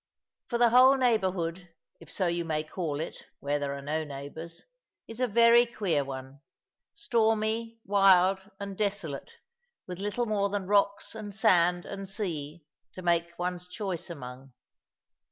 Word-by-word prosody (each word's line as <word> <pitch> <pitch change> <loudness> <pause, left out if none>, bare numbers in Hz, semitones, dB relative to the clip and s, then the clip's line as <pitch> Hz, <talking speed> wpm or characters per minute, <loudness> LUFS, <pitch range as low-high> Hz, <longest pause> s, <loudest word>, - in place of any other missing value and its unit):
For 240 - -1
the 235 -1 +4
whole 260 +3 +7
neighbourhood 185 -8 0 0.3
if 165 -2 -13
so 190 - 0
you 170 0 0
may 155 -2 -1
call 155 -2 -4
it, 160 - -6
where 145 +1 -1
there 140 -1 -3
are 140 - -9
no 155 +2 -1
neighbours 150 +4 -8 0.4
is 225 +1 -8
a 255 - +2
very 235 +2 +6
queer 195 -11 0
one 135 +1 -8 0.5
stormy, 225 -4 0
wild, 195 -1 +4
and 200 -1 -6
desolate, 195 -8 -3 0.5
with 180 -1 -7
little 210 +4 -1
more 205 -2 0
than 200 -1 -2
rocks 200 +1 +1
and 210 -3 -7
sand 180 -5 +3
and 195 -1 -7
sea 165 -6 -4 0.3
to 185 - -8
make 170 0 0
one's 180 0 -3
choice 185 -3 -5
among. 130 -4 -9
185 Hz, 150 wpm, -29 LUFS, 160-215 Hz, 0.5 s, whole